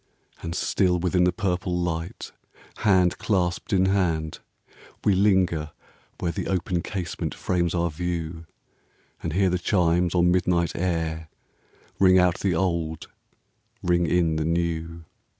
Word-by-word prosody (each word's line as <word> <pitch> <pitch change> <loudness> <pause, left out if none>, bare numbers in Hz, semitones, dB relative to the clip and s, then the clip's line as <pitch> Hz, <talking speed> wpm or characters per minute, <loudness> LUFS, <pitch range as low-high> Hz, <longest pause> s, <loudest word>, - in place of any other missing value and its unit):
And 85 +1 -5
still 90 0 +1
within 90 +1 +2
the 90 - +3
purple 90 0 -1
light, 85 -1 -3 0.5
Hand 95 -4 +3
clasped 90 -2 -1
in 95 -2 +3
hand, 85 -5 0 0.7
we 100 - +5
linger 95 -6 +2 0.5
where 85 - -1
The - - -4
open 90 -2 -1
casement 90 -2 -4
frames 90 -1 0
our 85 -1 0
view, 85 0 -4 0.7
And 80 - -3
hear 95 +1 +2
the 90 - 0
chimes 90 -1 +1
on 90 0 +4
midnight 90 -1 +1
air 80 -3 -2 0.7
Ring 95 -1 +6
out 90 -1 +3
the 95 -4 0
old, 85 -3 -1 0.7
ring 85 -1 +2
in 85 -2 +2
the 80 - 0
new. 85 0 -2
90 Hz, 130 wpm, -25 LUFS, 85-90 Hz, 0.7 s, Ring